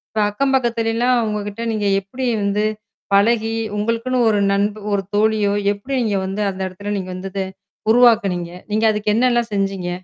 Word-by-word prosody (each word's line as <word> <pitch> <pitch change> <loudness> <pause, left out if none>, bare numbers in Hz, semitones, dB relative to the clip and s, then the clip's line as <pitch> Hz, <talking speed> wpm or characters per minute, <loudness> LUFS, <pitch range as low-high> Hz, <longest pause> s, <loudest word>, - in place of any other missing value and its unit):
ப்ப - - +1
அக்கம் 270 +6 0
பக்கத்தில 230 -3 0
எல்லாம் 245 +2 +2
அவுங்ககிட்ட 210 0 -3
நீங்க 210 -1 -1 0.2
எப்படி 250 +7 -5 0.2
வந்து 205 +1 +1 0.5
பழகி, 225 +2 +3 0.2
உங்களுக்குன்னு 230 +4 -1
ஒரு 205 -1 +2
நண்ப 205 +1 0
ஒரு 200 - +1
தோழியோ! 210 -1 +2 0.2
எப்படி 230 +7 -7
நீங்க 205 -3 0
வந்து 195 +2 -3
அந்த 190 0 -6
எடத்துல 200 +3 -5
நீங்க 185 -1 -5
வந்து 190 +1 -6
அத 195 -1 -1 0.5
உருவாக்கினீங்க? 205 -8 +3 0.2
நீங்க 220 +1 +2
அதுக்கு 210 0 -1
என்னல்லாம் 240 -2 +2
செஞ்சீங்க? 195 -2 -1
210 Hz, 160 wpm, -20 LUFS, 200-230 Hz, 0.5 s, பழகி